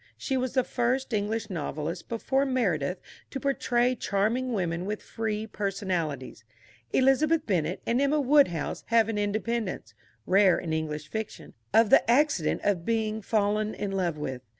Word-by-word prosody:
She 270 - -2
was 255 -1 -1
the 260 -1 +3
first 250 +1 -1
English 215 +1 -1
novelist 160 0 -4
before 265 +4 0
Meredith 190 - 0 0.3
to 270 - -5
portray 250 -2 +1
charming 230 +3 0
women 180 -4 -2
with 210 +1 -2
free 220 -1 -3
personalities. 180 - -3 0.5
Elizabeth 290 +5 +3
Bennet 180 -3 -1
and 240 +3 +1
Emma 285 +2 +2
Woodhouse 275 - +2
have 230 -1 +3
an 215 -2 -1
independence 215 0 -2 0.3
(rare 190 0 +5
in 165 -3 -3
English 155 -1 -3
fiction) 220 +5 -6 0.2
of 225 -1 +4
the - - +8
accident 245 - +2
of 195 -5 +1
being 220 0 -1
fallen 215 0 0
in 205 - -3
love 180 -5 -1
with. 130 -4 -4
215 Hz, 150 wpm, -27 LUFS, 180-245 Hz, 0.5 s, the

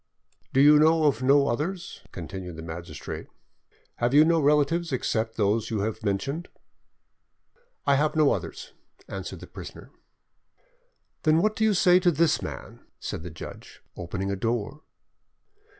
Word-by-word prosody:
"Do 135 - +3
you 150 +1 +7
know 160 +1 +4
of 140 -5 +2
no 140 +2 +4
others?" 170 +9 -3
continued 90 0 -7
the 80 - -8
magistrate. 80 -2 -7 0.7
"Have 120 +3 +1
you 150 +1 +8
no 165 0 +3
relatives 150 +3 +2
except 115 -3 -1
those 105 +1 +1
you 110 -3 -1
have 110 +1 -3
mentioned?" 135 - -2 1.4
"I 140 - +4
have 150 +2 +1
no 155 -2 +4
others," - - -6 0.3
answered - - -7
the - - -8
prisoner. - - -11 1.3
"Then 155 0 +3
what 215 +4 +1
do 220 - -1
you 215 -2 +3
say 180 0 +5
to 180 -1 +3
this 165 0 +2
man?" - - -7 0.2
said - - -5
the 90 - -7
judge, 80 - -11
opening 95 +3 -4
a - - -1
door. 115 +7 -2
140 Hz, 150 wpm, -26 LUFS, 105-160 Hz, 1.4 s, you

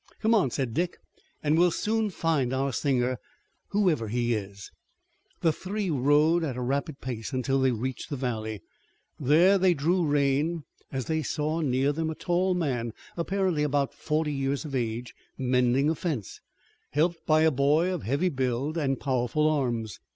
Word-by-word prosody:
"Come 220 +1 +2
on," 195 - +3
said 125 -1 -2
Dick, 175 +5 -1 0.5
"and 155 +2 +3
we'll 175 +1 +6
soon 220 +4 0
find 155 -8 0
our 135 0 0
singer, 125 -1 0 0.5
whoever 180 - +1
he 120 +2 0
is." 100 -2 -6 0.7
The 165 -2 +3
three 195 +2 -3
rode 150 +5 +3
at 135 -6 -3
a - - -3
rapid 140 +3 -2
pace 120 0 -5
until 130 +1 +1
they 130 - +4
reached 125 +4 -4
the 145 - -2
valley. 110 -5 -3 0.6
There 170 +8 +5
they 185 -1 +4
drew 170 +5 +1
rein, 145 +2 +1 0.3
as 130 -3 -3
they 160 -1 0
saw 155 +2 -1
near 135 -1 +2
them 160 +1 -2
a 160 - -4
tall 180 +2 +1
man, 125 -9 -1 0.2
apparently 185 -2 0
about 145 -2 +1
forty 155 -1 -1
years 135 +2 -1
of 145 - -7
age, 120 -1 -2 0.2
mending 125 +1 +2
a 160 - +3
fence, 150 - -4 0.5
helped 165 +3 0
by 155 0 +5
a 160 0 +5
boy 150 +6 +2
of 175 - -3
heavy 140 - 0
build 135 +2 -1
and 135 -4 0
powerful 130 +3 +1
arms. 120 -8 -1
145 Hz, 165 wpm, -27 LUFS, 125-165 Hz, 0.7 s, we'll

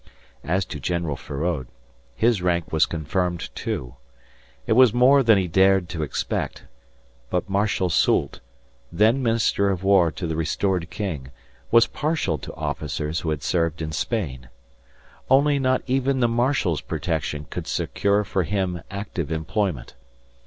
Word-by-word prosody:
As 90 +3 0
to 75 - -7
General 85 +1 -2
Feraud, 75 0 -3 0.5
his 115 -4 +2
rank 85 -2 0
was 80 0 +3
confirmed, 85 +2 -2
too. 60 0 -4 0.7
It - - +2
was 125 -1 +6
more 135 +3 +6
than 115 -5 +5
he 95 -2 0
dared 95 +1 +3
to 80 - -4
expect, 75 -4 -3 0.7
but 90 +4 -1
Marshal 100 -1 +1
Soult, - - +2 0.5
then 110 +9 +3
Minister 115 -4 +2
of 95 -1 -2
War 95 -4 +4
to 90 - -5
the 80 -1 -2
restored 85 +2 -1
king, 80 -7 -4 0.4
was 115 0 +6
partial 150 - -1
to - - -8
officers 75 +2 -3
who 80 - -3
had 75 -3 -2
served 85 -2 0
in 80 -1 -4
Spain. 75 - -3 0.8
Only 140 +2 +4
not 130 -1 +1
even 135 +1 +1
the 120 - +3
marshal's 115 - +1
protection 75 -3 -3
could - - -5
secure 100 +1 0
for 95 -1 -1
him 90 -2 -2
active 100 -6 -5
employment. 80 - -2
90 Hz, 145 wpm, -23 LUFS, 80-110 Hz, 0.8 s, was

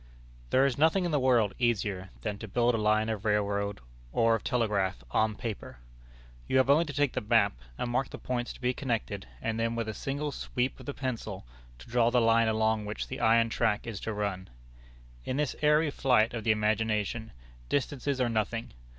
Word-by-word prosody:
There 135 +1 +4
is 140 -1 0
nothing 165 +4 +3
in 175 - -1
the 145 - +2
world 120 -6 +3
easier 100 -6 0
than 105 -2 -3
to 110 - -7
build 120 +4 +2
a - - +1
line 110 +1 +2
of 110 -3 -3
railroad, 100 -3 0 0.3
or 115 - +3
of 115 - -1
telegraph, 100 - 0
on 110 -1 +2
paper. 110 - -6 0.7
You - - +2
have 130 +1 +4
only 160 +4 +4
to 145 - -6
take 145 -1 +1
the - - -1
map, 105 - +3 0.2
and 120 - -2
mark 125 +2 0
the - - -7
points 120 -1 -3
to - - -15
be 125 0 +1
connected, 115 -7 -3 0.2
and 115 0 -1
then 115 0 0
with 115 -1 -2
a 110 - -3
single 145 +6 -3
sweep 125 -1 -2
of - - -12
the 145 - -4
pencil 115 - -4 0.3
to - - -14
draw 120 -1 +3
the 125 0 +3
line 115 0 +4
along 110 -1 +1
which 105 +1 -5
the - - -5
iron 115 +1 +4
track 110 -2 0
is 115 -4 -5
to 110 - -4
run. 100 -3 -3 0.7
In 130 - -3
this 150 -3 0
airy 150 0 +4
flight 125 -6 +3
of 115 -2 -4
the 110 - +3
imagination, 110 +1 0 0.4
distances 140 -1 -1
are 125 - +2
nothing. 115 0 -2
115 Hz, 200 wpm, -29 LUFS, 105-130 Hz, 0.7 s, There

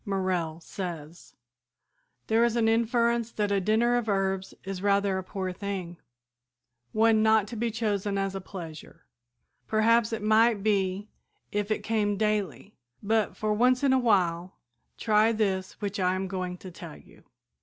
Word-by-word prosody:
Morrell 185 -5 -2
says: 170 -3 -8 0.9
"There 225 +1 +3
is 235 -1 +1
an 230 -2 +2
inference 235 +1 +1
that 205 -1 -1
a 200 -1 +2
dinner 230 +5 +2
of 235 -2 -2
herbs 195 -1 -1
is 195 -1 -5
rather 200 -1 +2
a - - -6
poor 185 -1 -4
thing, 185 -3 -5 0.9
one 220 0 +3
not 220 -1 +4
to 240 - -7
be 230 +1 -1
chosen 205 -3 -1
as 195 0 -1
a 195 - -5
pleasure. 165 -3 -10 0.6
Perhaps 225 +1 +3
it 225 -2 -3
might 220 -1 +3
be 200 -1 0 0.4
if 205 0 -2
it 215 - -1
came 210 -2 0
daily, 210 -6 -2 0.3
but, 220 +1 0
for 215 0 0
once 250 +4 +3
in 270 -2 +4
a 260 - +4
while, 185 -6 +1 0.4
try 215 0 +3
this 195 -4 -1
which 205 -1 -3
I 185 0 +2
am 190 0 -3
going 185 -1 -4
to 185 0 -10
tell 165 -2 -10
you. - - -19
205 Hz, 160 wpm, -27 LUFS, 190-220 Hz, 0.9 s, not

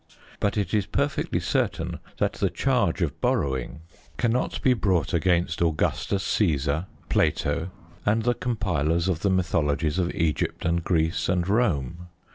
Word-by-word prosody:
But 100 +1 0
it 105 - -1
is 105 -2 +1
perfectly - - 0
certain - - -1 0.2
that - - +1
the - - 0
change - - +1
of - - -3
borrowing 65 0 -1 0.4
cannot 120 +1 0
be 130 - +5
brought 95 -8 0
against 85 +1 +1
Augustus 85 +4 0
Caesar, 80 -3 +1 0.2
Plato, 80 +4 +1 0.3
and 110 +2 +2
the 120 +1 +2
compilers 85 -9 0
of 90 -4 0
the 100 - +1
mythologies 85 -3 +1
of 90 -1 0
Egypt 80 -5 -1
and 85 0 +1
Greece 80 -1 0
and 90 -1 +1
Rome. 90 - 0
85 Hz, 140 wpm, -25 LUFS, 80-100 Hz, 0.4 s, be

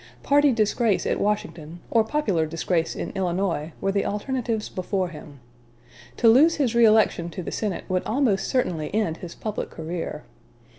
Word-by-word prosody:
Party 290 0 +4
disgrace 220 -2 +1
at - - 0
Washington, 175 -6 -2
or 225 -2 +4
popular 215 - 0
disgrace 165 +1 -1
in - - -4
Illinois, 175 -4 -1
were 195 - 0
the 200 0 0
alternatives 225 0 -2
before 185 0 -2
him. 150 -3 -12 0.8
To 235 - +3
lose 285 +9 +6
his 265 -6 0
reëlection 220 -7 +4
to 180 +2 -6
the - - -5
Senate 205 -5 -3
would 185 -1 0
almost 220 -6 +1
certainly 175 - -1
end 175 -7 0
his 175 -2 -9
public 215 -1 -4
career. 165 +1 -5
200 Hz, 155 wpm, -24 LUFS, 170-230 Hz, 0.8 s, lose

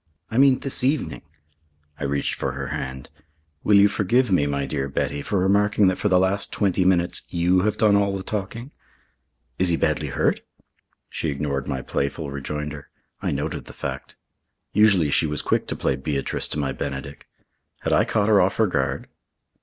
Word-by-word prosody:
"I 115 - +1
mean 135 -1 +6
this 135 -1 +1
evening." 140 +2 0 0.8
I 75 - -2
reached 70 0 -1
for - - -3
her - - -5
hand. 65 -1 -5 0.5
"Will 105 - +4
you 100 +1 +7
forgive 110 +4 +1
me, 75 -6 +3
my 70 -1 -1
dear 70 +1 -3
Betty, 70 +1 -2
for 100 +7 -2
remarking 100 +1 +3
that 95 - -2
for 105 - +1
the 90 - +4
last 95 +2 +1
twenty 95 -3 +1
minutes 90 -1 +2
you 90 +2 +2
have 105 - 0
done 105 -2 +4
all 100 -1 +1
the 95 - -6
talking?" 110 +7 -5 0.9
"Is 95 - +3
he 85 - +2
badly - - 0
hurt?" - - +1 0.7
She 80 - -3
ignored 70 -1 -2
my 65 -1 -3
playful 70 +1 -3
rejoinder. 75 +1 -5 0.3
I - - -1
noted - - -3
the - - -11
fact. - - -6 0.6
Usually 100 -8 +4
she 80 - +3
was 75 0 -3
quick - - 0
to - - -2
play 65 - 0
Beatrice 70 +1 -2
to - - -4
my 70 -3 -1
Benedick. 70 +1 -6 0.5
Had - - 0
I - - +5
caught 105 -2 0
her 105 -2 +6
off 90 +2 +1
her 110 - +4
guard? 95 - -1
90 Hz, 185 wpm, -23 LUFS, 70-105 Hz, 0.9 s, you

